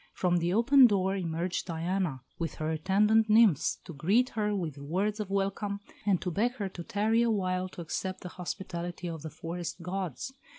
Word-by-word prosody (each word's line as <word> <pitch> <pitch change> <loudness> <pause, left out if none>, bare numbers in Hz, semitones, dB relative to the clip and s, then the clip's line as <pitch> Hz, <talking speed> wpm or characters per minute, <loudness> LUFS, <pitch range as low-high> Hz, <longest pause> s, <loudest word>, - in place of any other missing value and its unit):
From 175 -1 +1
the 170 +1 0
open 250 +5 +7
door 195 -2 +1
emerged 175 0 -2
Diana 170 -4 -2 0.2
with 165 -1 -3
her 155 0 -2
attendant 210 +7 +3
nymphs 215 - +5
to 170 - -8
greet 205 - +2
her 210 -3 -1
with 160 -7 -3
words 190 +9 -1
of 210 -2 -3
welcome, 200 +1 -1 0.3
and 190 -4 +4
to 180 - -1
beg 230 +7 +1
her 205 -6 -3
to 175 -2 -8
tarry 215 +5 +1
a 235 - +3
while 185 -3 0
to 180 - -9
accept 185 +3 -4
the 180 - -6
hospitality 175 -1 -5
of 165 -2 -5
the 160 - -6
forest 165 +4 -5
gods. 185 - -4
185 Hz, 185 wpm, -30 LUFS, 170-210 Hz, 0.3 s, open